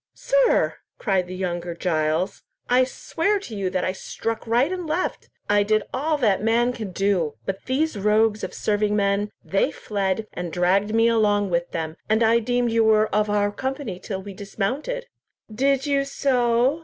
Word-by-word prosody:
"Sir," -, -, +2 dB, 0.2 s
cried 190 Hz, -4 st, 0 dB
the 185 Hz, -, -6 dB
younger 175 Hz, -2 st, -3 dB
Giles, 165 Hz, +2 st, 0 dB, 0.3 s
"I 255 Hz, +1 st, +4 dB
swear 330 Hz, +9 st, -1 dB
to 235 Hz, -, -8 dB
you 195 Hz, -2 st, -1 dB
that 185 Hz, -1 st, -1 dB
I -, -, 0 dB
struck 225 Hz, +4 st, -5 dB
right 245 Hz, +8 st, +2 dB
and 360 Hz, -3 st, -4 dB
left. 330 Hz, +4 st, -2 dB, 0.2 s
I 205 Hz, 0 st, +4 dB
did 215 Hz, +1 st, +2 dB
all 300 Hz, +4 st, 0 dB
that 210 Hz, -9 st, +2 dB
man 235 Hz, +3 st, +2 dB
could 210 Hz, -7 st, -6 dB
do, 190 Hz, -7 st, +1 dB
but 195 Hz, 0 st, -4 dB
these 290 Hz, +4 st, 0 dB
rogues 210 Hz, +1 st, +2 dB
of -, -, -3 dB
serving 210 Hz, 0 st, 0 dB
men, 200 Hz, 0 st, +1 dB, 0.2 s
they 195 Hz, -, +1 dB
fled, 200 Hz, 0 st, -2 dB
and 175 Hz, -1 st, -5 dB
dragged 195 Hz, +5 st, +2 dB
me 225 Hz, 0 st, +4 dB
along 205 Hz, -4 st, +2 dB
with 170 Hz, 0 st, 0 dB
them, 160 Hz, 0 st, -4 dB
and 220 Hz, +2 st, +3 dB
I 230 Hz, +1 st, +4 dB
deemed 245 Hz, +1 st, 0 dB
you 225 Hz, 0 st, +3 dB
were 215 Hz, -1 st, +3 dB
of 210 Hz, 0 st, +2 dB
our 205 Hz, 0 st, +1 dB
company 260 Hz, -5 st, -4 dB
till 190 Hz, -1 st, -5 dB
we 200 Hz, 0 st, -8 dB
dismounted." 255 Hz, -, -3 dB, 0.5 s
"Did 270 Hz, +3 st, +1 dB
you 280 Hz, -1 st, +2 dB
so? 255 Hz, 0 st, +1 dB
215 Hz, 180 wpm, -23 LUFS, 195-250 Hz, 0.5 s, I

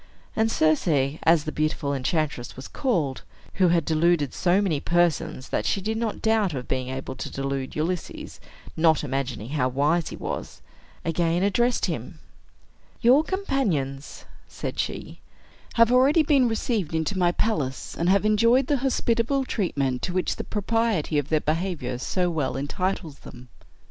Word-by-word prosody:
And 220 Hz, 0 st, +2 dB
Circe, 155 Hz, -3 st, +2 dB, 0.3 s
as 165 Hz, -2 st, +4 dB
the 155 Hz, -, -4 dB
beautiful 155 Hz, -2 st, -1 dB
enchantress 140 Hz, -1 st, -2 dB
was 130 Hz, -, -8 dB
called 165 Hz, -, -1 dB, 0.4 s
(who 185 Hz, -, +6 dB
had 170 Hz, -2 st, +2 dB
deluded 160 Hz, -3 st, +2 dB
so 180 Hz, +2 st, +2 dB
many 180 Hz, -8 st, +1 dB
persons 170 Hz, -5 st, 0 dB
that -, -, -1 dB
she -, -, 0 dB
did 220 Hz, +3 st, -2 dB
not 225 Hz, -2 st, -3 dB
doubt 220 Hz, -7 st, +2 dB
of 125 Hz, -2 st, -5 dB
being 130 Hz, -1 st, -2 dB
able 130 Hz, 0 st, -5 dB
to -, -, -5 dB
delude 135 Hz, -1 st, -3 dB
Ulysses, 165 Hz, +2 st, -4 dB, 0.4 s
not 160 Hz, -1 st, +3 dB
imagining 135 Hz, -5 st, -3 dB
how 135 Hz, -3 st, 0 dB
wise 150 Hz, +6 st, +1 dB
he -, -, -7 dB
was), -, -, -6 dB, 0.4 s
again 170 Hz, +1 st, +1 dB
addressed 240 Hz, +5 st, +2 dB
him: -, -, -5 dB, 0.8 s
"Your 255 Hz, +5 st, +6 dB
companions," 190 Hz, -, -2 dB, 0.2 s
said -, -, -6 dB
she, -, -, -4 dB, 0.6 s
"have 230 Hz, 0 st, +5 dB
already 275 Hz, +6 st, +5 dB
been 280 Hz, -4 st, +4 dB
received 220 Hz, -, -1 dB
into 160 Hz, +5 st, -1 dB
my 175 Hz, -2 st, +3 dB
palace, 150 Hz, -11 st, -2 dB
and 170 Hz, +2 st, 0 dB
have 200 Hz, +2 st, +3 dB
enjoyed 230 Hz, +5 st, +4 dB
the 285 Hz, +2 st, +1 dB
hospitable 260 Hz, 0 st, +1 dB
treatment 140 Hz, -, -1 dB
to 180 Hz, -, -3 dB
which 185 Hz, 0 st, -1 dB
the -, -, -4 dB
propriety 210 Hz, -7 st, 0 dB
of 145 Hz, +1 st, -5 dB
their 155 Hz, -1 st, +2 dB
behavior 155 Hz, -6 st, -2 dB
so 180 Hz, +7 st, 0 dB
well 155 Hz, -6 st, -1 dB
entitles 160 Hz, +2 st, -3 dB
them. 125 Hz, 0 st, -13 dB
170 Hz, 155 wpm, -25 LUFS, 145-220 Hz, 0.8 s, who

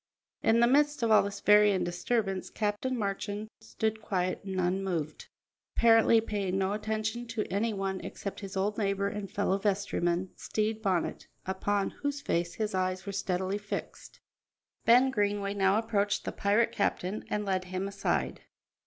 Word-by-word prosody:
In 225 Hz, +1 st, +4 dB
the 235 Hz, -, +6 dB
midst 290 Hz, +1 st, +3 dB
of 230 Hz, -, +2 dB
all 215 Hz, -, +7 dB
this 200 Hz, 0 st, -5 dB
varying 210 Hz, -2 st, +5 dB
disturbance 195 Hz, +2 st, -1 dB
Captain 215 Hz, +5 st, -1 dB
Marchand 205 Hz, 0 st, -3 dB
stood 220 Hz, 0 st, -2 dB
quiet 185 Hz, -3 st, -1 dB
and 190 Hz, -1 st, -3 dB
unmoved, 180 Hz, -4 st, -2 dB, 0.5 s
apparently 225 Hz, 0 st, +6 dB
paying 200 Hz, -4 st, -2 dB
no 190 Hz, +1 st, +1 dB
attention 220 Hz, +3 st, -2 dB
to 225 Hz, -2 st, -2 dB
any 220 Hz, +3 st, +1 dB
one 195 Hz, -2 st, -2 dB
except 200 Hz, -, -6 dB
his 195 Hz, -1 st, -6 dB
old 205 Hz, +3 st, 0 dB
neighbour 200 Hz, -1 st, 0 dB
and 205 Hz, -1 st, -5 dB
fellow 200 Hz, -1 st, 0 dB
vestryman, 190 Hz, -3 st, 0 dB
Stede 220 Hz, 0 st, -2 dB
Bonnet, 190 Hz, -5 st, -1 dB, 0.2 s
upon 195 Hz, +1 st, 0 dB
whose 285 Hz, 0 st, -3 dB
face 170 Hz, -9 st, -1 dB
his 215 Hz, -2 st, -2 dB
eyes 185 Hz, 0 st, -1 dB
were 200 Hz, -, -4 dB
steadily 190 Hz, +1 st, -1 dB
fixed. 205 Hz, -1 st, -7 dB, 0.7 s
Ben 250 Hz, +3 st, +6 dB
Greenway 205 Hz, -3 st, 0 dB
now 195 Hz, 0 st, +3 dB
approached 210 Hz, -2 st, 0 dB
the -, -, -2 dB
pirate 210 Hz, +3 st, +2 dB
captain 200 Hz, 0 st, -1 dB
and 210 Hz, 0 st, -1 dB
led 185 Hz, -2 st, 0 dB
him 185 Hz, +1 st, -3 dB
aside. 80 Hz, -, -1 dB
200 Hz, 155 wpm, -30 LUFS, 190-220 Hz, 0.7 s, all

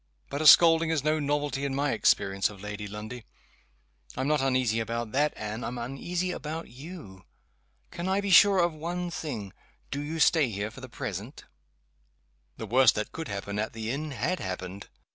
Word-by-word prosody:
"But 140 Hz, +2 st, -2 dB
a 155 Hz, -, +4 dB
scolding 165 Hz, 0 st, +8 dB
is 160 Hz, -4 st, 0 dB
no 155 Hz, +1 st, +2 dB
novelty 145 Hz, -1 st, -1 dB
in 140 Hz, -1 st, -1 dB
my 140 Hz, 0 st, +1 dB
experience 100 Hz, 0 st, +2 dB
of 105 Hz, -2 st, -12 dB
Lady 105 Hz, +1 st, -6 dB
Lundie. 110 Hz, +4 st, -7 dB, 0.9 s
I'm 130 Hz, +1 st, -1 dB
not 150 Hz, -2 st, +2 dB
uneasy 130 Hz, -4 st, +1 dB
about 115 Hz, 0 st, -3 dB
that, 145 Hz, +4 st, +2 dB
Anne 110 Hz, +2 st, -5 dB
I'm 120 Hz, +2 st, -4 dB
uneasy 170 Hz, +9 st, -3 dB
about 160 Hz, 0 st, -5 dB
you. 130 Hz, -, -11 dB, 0.7 s
Can 170 Hz, +2 st, -4 dB
I 190 Hz, +1 st, +2 dB
be 200 Hz, -1 st, -2 dB
sure 200 Hz, +2 st, +7 dB
of 175 Hz, -2 st, +2 dB
one 175 Hz, +3 st, -4 dB
thing 115 Hz, -, -5 dB, 0.4 s
do 140 Hz, +1 st, -2 dB
you 155 Hz, +3 st, -4 dB
stay 150 Hz, -3 st, +4 dB
here 105 Hz, 0 st, -4 dB
for 130 Hz, -, -12 dB
the 130 Hz, -, -9 dB
present?" 110 Hz, +3 st, -6 dB, 1.1 s
The -, -, -5 dB
worst 130 Hz, -2 st, +5 dB
that 105 Hz, -, -3 dB
could 160 Hz, -, -6 dB
happen 100 Hz, 0 st, -4 dB
at 110 Hz, -, -2 dB
the 110 Hz, 0 st, -4 dB
inn 150 Hz, +3 st, -3 dB
had 155 Hz, +7 st, -2 dB
happened. 95 Hz, +1 st, -6 dB
135 Hz, 180 wpm, -28 LUFS, 110-155 Hz, 1.1 s, scolding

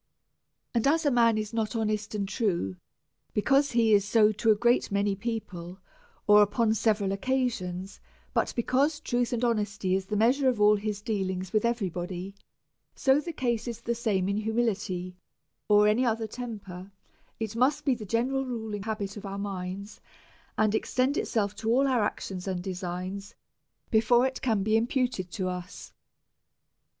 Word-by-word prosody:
And 235 Hz, +1 st, +2 dB
as 320 Hz, +3 st, +2 dB
a 290 Hz, -, +4 dB
man 230 Hz, -3 st, +4 dB
is 215 Hz, +1 st, -3 dB
not 225 Hz, 0 st, -1 dB
honest 215 Hz, -1 st, -1 dB
and 200 Hz, -2 st, -1 dB
true, 190 Hz, -, -1 dB, 0.6 s
because 275 Hz, +6 st, +3 dB
he 230 Hz, -2 st, +4 dB
is 200 Hz, -1 st, +5 dB
not -, -, -8 dB
so 215 Hz, -2 st, +5 dB
to 215 Hz, +2 st, 0 dB
a 215 Hz, -, +7 dB
great 240 Hz, +2 st, +2 dB
many 200 Hz, 0 st, +1 dB
peeple, 190 Hz, -5 st, -5 dB, 0.5 s
or 210 Hz, 0 st, +7 dB
upon 215 Hz, +2 st, +2 dB
several 210 Hz, -3 st, +1 dB
occa 255 Hz, +6 st, +1 dB
sions, 185 Hz, -1 st, -6 dB, 0.3 s
but -, -, +1 dB
because 275 Hz, +6 st, +1 dB
truth 245 Hz, -5 st, -1 dB
and 240 Hz, 0 st, 0 dB
honesty 205 Hz, -5 st, 0 dB
is 190 Hz, 0 st, -1 dB
the 210 Hz, -, -2 dB
measure 255 Hz, +6 st, +3 dB
of 245 Hz, -4 st, -1 dB
all 210 Hz, 0 st, +6 dB
his 205 Hz, 0 st, -4 dB
dealings 190 Hz, -4 st, -2 dB
with 215 Hz, -, +2 dB
every 235 Hz, -6 st, 0 dB
body, 180 Hz, +2 st, -5 dB, 0.6 s
so 270 Hz, 0 st, +3 dB
the 335 Hz, +3 st, -5 dB
case 240 Hz, -6 st, -1 dB
is 235 Hz, -1 st, -5 dB
the 235 Hz, -, -1 dB
same 215 Hz, -6 st, 0 dB
in 200 Hz, +1 st, 0 dB
humility 210 Hz, -5 st, -1 dB, 0.5 s
or 210 Hz, 0 st, +6 dB
any 215 Hz, +4 st, +3 dB
other 225 Hz, -2 st, 0 dB
temper; 205 Hz, -5 st, -7 dB, 0.5 s
it 220 Hz, -1 st, -4 dB
must 255 Hz, +5 st, +2 dB
be 275 Hz, -, +4 dB
the 230 Hz, -3 st, -6 dB
gene 230 Hz, +5 st, 0 dB
ral 270 Hz, 0 st, 0 dB
ruling 220 Hz, -5 st, -4 dB
habit 210 Hz, -1 st, -4 dB
of 205 Hz, -, -8 dB
our 195 Hz, 0 st, -5 dB
minds, 200 Hz, 0 st, -5 dB, 0.6 s
and 215 Hz, -1 st, +2 dB
extend 255 Hz, +5 st, +1 dB
itself 205 Hz, -7 st, 0 dB
to 220 Hz, +2 st, -3 dB
all 265 Hz, +4 st, +4 dB
our 255 Hz, -4 st, +2 dB
actions 190 Hz, -2 st, -3 dB
and 180 Hz, -2 st, -2 dB
designs, 185 Hz, +1 st, -5 dB, 0.6 s
before 235 Hz, +3 st, +4 dB
it 260 Hz, 0 st, -3 dB
can 220 Hz, -6 st, +1 dB
be 215 Hz, +2 st, +2 dB
imputed 240 Hz, -4 st, 0 dB
to 185 Hz, +1 st, -3 dB
us. 180 Hz, 0 st, -7 dB
215 Hz, 175 wpm, -28 LUFS, 195-235 Hz, 0.6 s, a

